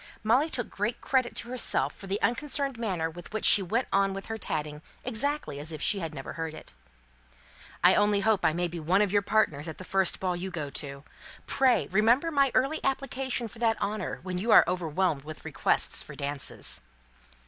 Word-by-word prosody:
Molly 250 Hz, +9 st, +3 dB
took 245 Hz, -6 st, -2 dB
great 210 Hz, +4 st, -2 dB
credit 255 Hz, -3 st, 0 dB
to 235 Hz, -, -3 dB
herself 250 Hz, -1 st, 0 dB
for 195 Hz, -, -11 dB
the 200 Hz, +2 st, -1 dB
unconcerned 275 Hz, 0 st, 0 dB
manner 185 Hz, -8 st, -1 dB
with 175 Hz, +2 st, -10 dB
which 215 Hz, 0 st, -2 dB
she 205 Hz, -, +7 dB
went 220 Hz, +7 st, -1 dB
on 195 Hz, 0 st, +2 dB
with 195 Hz, -, -6 dB
her -, -, -4 dB
tatting 150 Hz, -4 st, -3 dB, 0.2 s
exactly 280 Hz, -, -2 dB
as 155 Hz, +3 st, -4 dB
if 155 Hz, -, -5 dB
she 200 Hz, -, +1 dB
had 165 Hz, -3 st, -4 dB
never 135 Hz, -3 st, -7 dB
heard 160 Hz, -1 st, -5 dB
it. -, -, -12 dB, 1.1 s
"I -, -, +7 dB
only 205 Hz, -1 st, +3 dB
hope 215 Hz, -2 st, +2 dB
I -, -, +4 dB
may 175 Hz, +2 st, -1 dB
be 170 Hz, 0 st, -6 dB
one 180 Hz, +6 st, +3 dB
of 200 Hz, -, -1 dB
your 205 Hz, 0 st, +3 dB
partners 195 Hz, -8 st, +1 dB
at 160 Hz, -, -6 dB
the -, -, -8 dB
first 190 Hz, -1 st, +1 dB
ball 185 Hz, -2 st, -1 dB
you 180 Hz, +2 st, -4 dB
go 150 Hz, -6 st, -5 dB
to. 140 Hz, 0 st, -4 dB, 0.4 s
Pray, 265 Hz, -2 st, +3 dB
remember 235 Hz, -, +3 dB
my 275 Hz, -3 st, +3 dB
early 275 Hz, +5 st, +1 dB
application 265 Hz, -2 st, -1 dB
for 225 Hz, +1 st, -13 dB
that 225 Hz, -2 st, +1 dB
honour, 200 Hz, -2 st, -3 dB
when 180 Hz, -1 st, -3 dB
you 220 Hz, +5 st, -3 dB
are -, -, +9 dB
overwhelmed 175 Hz, -3 st, 0 dB
with 155 Hz, +1 st, -10 dB
requests -, -, +1 dB
for -, -, -8 dB
dances." 140 Hz, -1 st, -3 dB
195 Hz, 205 wpm, -28 LUFS, 165-235 Hz, 1.1 s, are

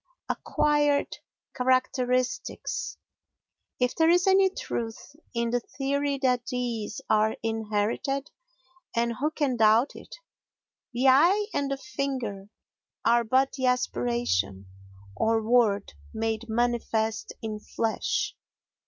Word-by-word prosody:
Acquired 295 Hz, -1 st, +1 dB, 0.4 s
Characteristics 255 Hz, -, 0 dB, 0.8 s
If 250 Hz, 0 st, +1 dB
there 325 Hz, 0 st, +4 dB
is 355 Hz, +1 st, +4 dB
any 385 Hz, 0 st, +5 dB
truth 235 Hz, -, -5 dB, 0.2 s
in 235 Hz, 0 st, 0 dB
the 245 Hz, -, +2 dB
theory 280 Hz, +3 st, -2 dB
that 250 Hz, -2 st, +2 dB
these 240 Hz, -4 st, -3 dB
are 215 Hz, 0 st, +3 dB
inherited—and 235 Hz, -, -3 dB
who 295 Hz, +4 st, +1 dB
can 285 Hz, -5 st, -1 dB
doubt 220 Hz, +4 st, +4 dB
it?—the 385 Hz, -, -7 dB
eye 345 Hz, +11 st, +5 dB
and 280 Hz, -1 st, 0 dB
the 275 Hz, -, -1 dB
finger 235 Hz, -6 st, -4 dB, 0.6 s
are 235 Hz, +1 st, +4 dB
but 260 Hz, +4 st, +2 dB
the 260 Hz, -2 st, -1 dB
aspiration, 120 Hz, -, 0 dB, 0.5 s
or 225 Hz, -, +2 dB
word, 225 Hz, -5 st, +3 dB, 0.2 s
made 225 Hz, +1 st, -2 dB
manifest 220 Hz, -2 st, 0 dB
in 215 Hz, -1 st, -4 dB
flesh. 220 Hz, +1 st, -2 dB
245 Hz, 100 wpm, -27 LUFS, 220-280 Hz, 0.8 s, any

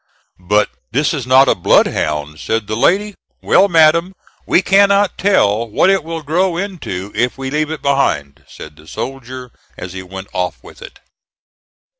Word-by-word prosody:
"But 105 Hz, +4 st, +1 dB, 0.2 s
this 145 Hz, +6 st, 0 dB
is 135 Hz, -6 st, -4 dB
not 130 Hz, +1 st, +5 dB
a -, -, +4 dB
bloodhound," 75 Hz, -3 st, 0 dB
said 110 Hz, -1 st, -2 dB
the 110 Hz, -, -4 dB
lady. 200 Hz, -, +1 dB, 0.3 s
"Well, 195 Hz, -, +4 dB
madam, 170 Hz, +1 st, +3 dB, 0.3 s
we 185 Hz, -, +3 dB
cannot 200 Hz, +1 st, +3 dB
tell 115 Hz, -, +1 dB
what 185 Hz, -, +3 dB
it 195 Hz, -5 st, +1 dB
will 165 Hz, 0 st, -6 dB
grow 170 Hz, +4 st, 0 dB
into 165 Hz, -, -5 dB
if 120 Hz, +4 st, -1 dB
we 135 Hz, 0 st, -5 dB
leave 150 Hz, +1 st, -1 dB
it 160 Hz, -1 st, -6 dB
behind," 85 Hz, -, -1 dB
said 75 Hz, -1 st, -12 dB
the 80 Hz, -, -18 dB
soldier 130 Hz, +1 st, -7 dB, 0.3 s
as 90 Hz, 0 st, -8 dB
he 95 Hz, -, -6 dB
went 95 Hz, +1 st, -10 dB
off 90 Hz, -1 st, -2 dB
with -, -, -15 dB
it. -, -, -12 dB
135 Hz, 165 wpm, -16 LUFS, -, 0.3 s, not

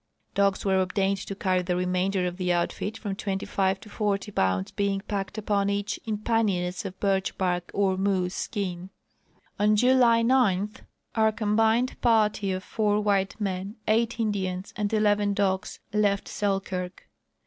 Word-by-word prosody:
Dogs 200 Hz, 0 st, +1 dB
were 190 Hz, -1 st, +3 dB
obtained 195 Hz, +1 st, 0 dB
to 195 Hz, -, -4 dB
carry 185 Hz, -2 st, +1 dB
the 180 Hz, 0 st, -1 dB
remainder 180 Hz, +1 st, 0 dB
of 180 Hz, 0 st, -3 dB
the 180 Hz, -1 st, 0 dB
outfit, 175 Hz, +5 st, -1 dB
from 200 Hz, -3 st, -4 dB
twenty 195 Hz, -1 st, -3 dB
five 190 Hz, -1 st, 0 dB
to -, -, -12 dB
forty 205 Hz, -1 st, -1 dB
poun 95 Hz, -, +1 dB
ds -, -, -15 dB
being 200 Hz, -1 st, -1 dB
packed 195 Hz, -2 st, -4 dB
uj)on 205 Hz, -2 st, 0 dB
each 205 Hz, +1 st, -2 dB
in 215 Hz, -1 st, -1 dB
panniers 205 Hz, -5 st, 0 dB
of 190 Hz, -1 st, -7 dB
birch 195 Hz, -1 st, 0 dB
bark 180 Hz, -2 st, -1 dB
or 195 Hz, -2 st, +1 dB
moose 190 Hz, -2 st, 0 dB
skin. 185 Hz, -3 st, -4 dB, 0.7 s
On 210 Hz, +1 st, +4 dB
July 240 Hz, 0 st, +5 dB
9 210 Hz, -5 st, +3 dB, 0.4 s
our 220 Hz, -1 st, +3 dB
combined 220 Hz, +3 st, +1 dB
party 215 Hz, -4 st, +2 dB
of 185 Hz, 0 st, -3 dB
four 210 Hz, 0 st, +1 dB
white 200 Hz, -1 st, 0 dB
men, 195 Hz, 0 st, -3 dB
eight 230 Hz, +2 st, +1 dB
In 220 Hz, -2 st, +1 dB
dians, 185 Hz, -1 st, -3 dB
and 210 Hz, -1 st, -1 dB
eleven 205 Hz, -2 st, +2 dB
dogs 195 Hz, -1 st, -1 dB
left 205 Hz, -2 st, +1 dB
Selkirk. 195 Hz, -3 st, -3 dB
200 Hz, 160 wpm, -26 LUFS, 190-210 Hz, 0.7 s, July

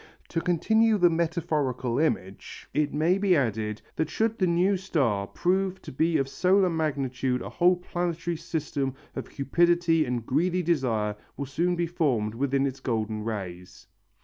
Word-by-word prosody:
To 165 Hz, -, -1 dB
continue 220 Hz, +6 st, +3 dB
the 175 Hz, -3 st, +5 dB
metaphorical 155 Hz, -7 st, -1 dB
image 100 Hz, -11 st, -2 dB
it 150 Hz, -1 st, +1 dB
may 165 Hz, +6 st, +2 dB
be 195 Hz, -2 st, +3 dB
added 110 Hz, -5 st, -1 dB
that 160 Hz, -, 0 dB
should 225 Hz, 0 st, 0 dB
the 185 Hz, -, +3 dB
new 180 Hz, +4 st, +3 dB
star 135 Hz, -, 0 dB
prove 190 Hz, -, 0 dB
to -, -, -8 dB
be 160 Hz, +5 st, +1 dB
of 135 Hz, -, 0 dB
solar 185 Hz, +5 st, +3 dB
magnitude 135 Hz, -5 st, -1 dB
a -, -, -6 dB
whole 180 Hz, +1 st, +3 dB
planetary 175 Hz, -1 st, -3 dB
system 145 Hz, -4 st, -3 dB, 0.2 s
of -, -, -5 dB
cupidity 170 Hz, +3 st, +2 dB
and 120 Hz, -3 st, -3 dB
greedy 175 Hz, +7 st, +1 dB
desire 120 Hz, -11 st, 0 dB, 0.2 s
will 140 Hz, -, -3 dB
soon 170 Hz, +6 st, 0 dB
be 175 Hz, 0 st, 0 dB
formed 135 Hz, -11 st, 0 dB
within 135 Hz, +2 st, 0 dB
its 135 Hz, 0 st, -3 dB
golden 110 Hz, -4 st, -2 dB
rays. 95 Hz, -5 st, -6 dB
155 Hz, 155 wpm, -27 LUFS, 125-175 Hz, 0.2 s, the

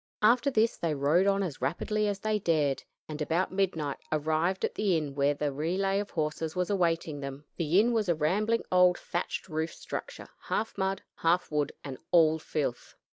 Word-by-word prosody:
After 240 Hz, +5 st, +5 dB
this 225 Hz, -3 st, +2 dB
they 165 Hz, -3 st, -1 dB
rode 150 Hz, +7 st, +3 dB
on 200 Hz, 0 st, +2 dB
as 155 Hz, -9 st, -5 dB
rapidly 210 Hz, +10 st, 0 dB
as 200 Hz, -1 st, -2 dB
they 215 Hz, -1 st, 0 dB
dared, 155 Hz, -7 st, +1 dB, 0.2 s
and 155 Hz, 0 st, -6 dB
about 165 Hz, +5 st, 0 dB
midnight 170 Hz, -7 st, -1 dB
arrived 160 Hz, +4 st, +1 dB
at -, -, -3 dB
the 195 Hz, -5 st, +1 dB
inn 150 Hz, -3 st, -3 dB
where 140 Hz, +1 st, +2 dB
the 145 Hz, 0 st, -1 dB
relay 185 Hz, +7 st, 0 dB
of 205 Hz, -, -4 dB
horses 155 Hz, +1 st, -2 dB
was 180 Hz, +2 st, 0 dB
awaiting 165 Hz, -5 st, 0 dB
them. 140 Hz, +1 st, -7 dB
The 170 Hz, +3 st, +3 dB
inn 235 Hz, +3 st, +3 dB
was 215 Hz, -5 st, +1 dB
a 170 Hz, -, +3 dB
rambling 210 Hz, +9 st, +1 dB
old 180 Hz, -1 st, +5 dB
thatched 175 Hz, -, -4 dB
roofed 160 Hz, -1 st, -3 dB
structure, -, -, -7 dB, 0.2 s
half 220 Hz, -, -2 dB
mud, 190 Hz, 0 st, -1 dB
half 170 Hz, +1 st, +1 dB
wood, 150 Hz, -2 st, 0 dB
and 135 Hz, -2 st, -7 dB
all 160 Hz, -2 st, +5 dB
filth. 145 Hz, -5 st, -3 dB
170 Hz, 185 wpm, -29 LUFS, 150-195 Hz, 0.2 s, After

